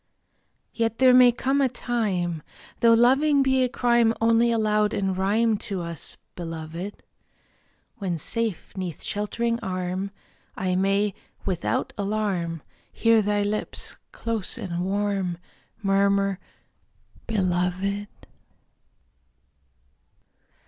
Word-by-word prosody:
Yet 230 -1 0
there 255 0 +6
may 250 -1 +8
come 270 +3 0
a 265 - +3
time 195 -10 -1 0.4
(Though 230 -1 +6
loving 270 +5 +4
be 265 -1 +3
a 250 - +1
crime 235 -2 +3
Only 230 +1 +4
allowed 210 -2 +2
in 195 -1 0
rhyme 210 +4 +2
To 195 -3 -4
us, 170 -3 -3 0.2
Beloved), 165 +3 -6 1.0
When 185 -4 -2
safe 225 +4 -2
'neath 180 -5 -5
sheltering 230 +3 -1
arm 185 -1 -3 0.5
I 185 -1 0
may, 195 +2 +2 0.3
without 180 -4 -1
alarm, 195 -6 -1 0.3
Hear 230 -1 +4
thy 205 0 +1
lips, 210 +1 -3 0.2
close 225 -4 -4
and 175 -2 -3
warm, 195 -2 -1 0.5
Murmur: 195 0 +2 0.9
"Beloved!" 190 0 0
205 Hz, 100 wpm, -25 LUFS, 185-230 Hz, 1.0 s, may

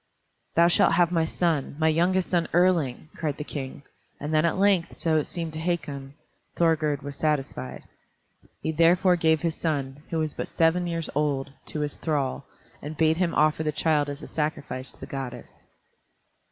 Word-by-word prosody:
"Thou 170 +1 +6
shalt 170 - +4
have 175 0 +3
my 165 -2 +2
son, 160 -4 0
my 160 0 +2
youngest 175 +4 +2
son 170 -2 +2
Erling!" 165 -6 +2
cried 150 -4 -2
the 150 - -4
King, 140 -1 -6 0.4
and 150 +2 -4
then 155 +1 +4
at 170 - +1
length, 195 -3 +2
so 160 -1 +1
it 150 - 0
seemed 165 -3 -4
to 155 - -4
Hakon, 145 -5 -3 0.4
Thorgerd 155 -4 +2
was 140 0 -6
satisfied. 135 - -2 0.8
He 160 - 0
therefore 175 +3 +4
gave 160 -2 +2
his 165 -1 +1
son, 145 -4 -2
who 165 - -2
was 155 -2 -1
but - - -4
seven 170 +2 +2
years 165 -1 -2
old, 140 -2 0 0.2
to 150 - -4
his 145 -1 -3
thrall, 140 -3 -2 0.3
and 150 +1 -7
bade 160 0 +3
him 175 -2 0
offer 155 +1 +3
the 155 -1 0
child 150 -1 +1
as 145 +1 -6
a - - -7
sacrifice 145 -4 -2
to - - -11
the - - -7
goddess. 135 -3 -7
155 Hz, 180 wpm, -26 LUFS, 145-170 Hz, 0.8 s, Thou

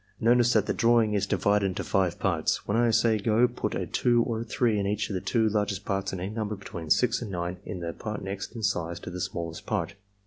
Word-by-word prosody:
Notice 120 +1 +4
that 110 -2 +3
the - - 0
drawing 115 -2 +3
is 100 -1 0
divided 100 +1 +2
into 95 - -3
five 95 -3 +1
parts. 85 -5 0
When 105 - 0
I 120 0 +3
say 115 0 +3
'go' 110 +3 +3
put 120 - -3
a - - -2
2 120 -1 +2
or 115 -2 -2
a - - -2
3 110 -1 +1
in 100 - -1
each 105 +1 -1
of - - -2
the 90 - -2
two 115 -2 +1
largest 105 -2 -1
parts 95 0 -1
and 95 - -4
any 95 +3 -4
number 110 -1 -2
between 85 -5 -8
6 120 +8 +3
and 115 - -5
9 90 -1 -3
in 95 -4 -5
the 85 -1 -4
part 105 -2 -5
next 95 +4 -5
in 115 - -6
size 85 -3 -1
to - - -7
the 90 0 -5
smallest 85 -1 -5
part. 100 -4 -1
105 Hz, 250 wpm, -27 LUFS, 95-115 Hz, -, Notice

